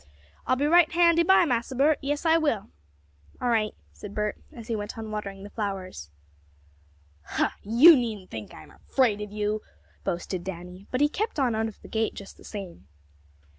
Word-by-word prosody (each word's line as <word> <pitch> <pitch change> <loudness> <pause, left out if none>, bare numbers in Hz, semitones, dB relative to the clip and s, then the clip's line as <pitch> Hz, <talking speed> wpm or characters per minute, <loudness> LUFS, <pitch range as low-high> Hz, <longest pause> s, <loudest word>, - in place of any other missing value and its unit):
"I'll - - +3
be 280 +3 0
right 340 +1 +5
handy 340 0 +5
by, 360 +1 +5
Massa 245 -2 -1
Bert, 290 +4 +3
yes, 290 +3 -2
I 325 0 +5
will!" 290 - 0 0.7
"All 245 - 0
right," 220 -2 +1 0.2
said 205 -1 -10
Bert, 210 0 -2
as 235 -7 -11
he 230 - -1
went 205 +1 -5
on 220 -1 -6
watering 200 -2 -5
the 205 - -10
flowers. 190 - -5 1.1
"Huh! - - 0
You 245 +11 +8
needn't 220 -7 -3
think 110 -4 -7
I'm 80 - -13
afraid 230 -6 0
of 210 -1 -6
you!" 210 0 -1 0.4
boasted 175 +1 -3
Danny, 180 +1 -8
but 255 - -1
he 295 - +6
kept 425 +8 -3
on 255 -4 +2
out 220 0 0
of 220 - -10
the - - -10
gate 220 0 -1
just 200 - -10
the - - -16
same. 195 -5 -8
220 Hz, 185 wpm, -26 LUFS, 200-280 Hz, 1.1 s, You